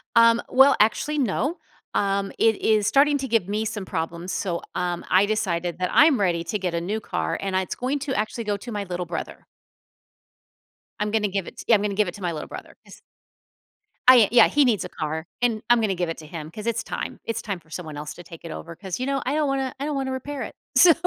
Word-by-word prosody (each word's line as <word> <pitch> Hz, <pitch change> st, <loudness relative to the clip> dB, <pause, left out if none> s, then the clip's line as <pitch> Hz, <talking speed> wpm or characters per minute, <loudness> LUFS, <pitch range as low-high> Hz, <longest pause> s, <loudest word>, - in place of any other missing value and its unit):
Um, 230 Hz, 0 st, +6 dB
well, 270 Hz, +1 st, +6 dB
actually, 255 Hz, +8 st, +2 dB
no, 275 Hz, -, 0 dB, 0.4 s
um, 195 Hz, 0 st, 0 dB
it 225 Hz, -2 st, +3 dB
is 215 Hz, -2 st, +3 dB
starting 285 Hz, +1 st, +4 dB
to 270 Hz, -, -3 dB
give 225 Hz, -7 st, +1 dB
me 215 Hz, +2 st, -1 dB
some 210 Hz, -3 st, -4 dB
problems, 170 Hz, +1 st, -4 dB
so, 175 Hz, -4 st, -2 dB
um, 175 Hz, -1 st, -2 dB
I 185 Hz, +2 st, +5 dB
decided 175 Hz, -5 st, -1 dB
that 180 Hz, -1 st, 0 dB
I'm 295 Hz, -5 st, +6 dB
ready 175 Hz, -4 st, +1 dB
to 210 Hz, +5 st, -2 dB
get 180 Hz, -2 st, -2 dB
a 170 Hz, -, -1 dB
new 205 Hz, +6 st, -2 dB
car, -, -, -2 dB
and 195 Hz, -1 st, -2 dB
it's 185 Hz, -1 st, -1 dB
going 265 Hz, +4 st, -1 dB
to 270 Hz, -1 st, -3 dB
actually 220 Hz, +1 st, -2 dB
go 205 Hz, -2 st, -1 dB
to 240 Hz, +4 st, -9 dB
my 205 Hz, -2 st, -2 dB
little 180 Hz, -1 st, -4 dB
brother. 165 Hz, -1 st, -6 dB, 1.5 s
I'm 210 Hz, 0 st, -1 dB
gonna 215 Hz, -1 st, +2 dB
give 195 Hz, -2 st, -3 dB
it -, -, -10 dB
t -, -, -9 dB
yeah, 230 Hz, -, +7 dB
I'm 205 Hz, -, +1 dB
gonna 205 Hz, -1 st, -1 dB
give 210 Hz, 0 st, +2 dB
it 175 Hz, -, -5 dB
to 205 Hz, -, -11 dB
my 175 Hz, -2 st, -1 dB
little 155 Hz, -2 st, -5 dB
brother. -, -, -10 dB
His -, -, -15 dB, 1.1 s
I 255 Hz, -2 st, +9 dB
uh, -, -, +3 dB
yeah, 240 Hz, -, +7 dB
he 290 Hz, -, +3 dB
needs 235 Hz, -7 st, +2 dB
a -, -, -7 dB
car 160 Hz, +1 st, -4 dB
and 230 Hz, -3 st, +1 dB
I'm 240 Hz, -1 st, +5 dB
gonna 205 Hz, -3 st, +1 dB
give 175 Hz, -1 st, -1 dB
it 165 Hz, -, -4 dB
to 155 Hz, -, -10 dB
him 155 Hz, 0 st, -7 dB
'cause 210 Hz, +6 st, -8 dB
it's 235 Hz, -1 st, -1 dB
time, -, -, -5 dB
it's 230 Hz, 0 st, -2 dB
time 200 Hz, -4 st, -4 dB
for 160 Hz, -1 st, -27 dB
someone 155 Hz, -2 st, -7 dB
else 150 Hz, +1 st, -6 dB
to 175 Hz, -, -11 dB
take 165 Hz, 0 st, -12 dB
it 165 Hz, -, -6 dB
over 170 Hz, +1 st, -8 dB
'cause, 190 Hz, +1 st, -5 dB
you 255 Hz, -, -1 dB
know, 275 Hz, 0 st, 0 dB
I -, -, 0 dB
don't 305 Hz, -1 st, +1 dB
wanna 270 Hz, -1 st, -1 dB
I 280 Hz, -, -2 dB
don't 300 Hz, -1 st, -2 dB
wanna 270 Hz, -1 st, -2 dB
repair 275 Hz, +2 st, -4 dB
it. -, -, -8 dB, 0.2 s
So 345 Hz, -2 st, +9 dB
210 Hz, 250 wpm, -24 LUFS, 175-245 Hz, 1.5 s, I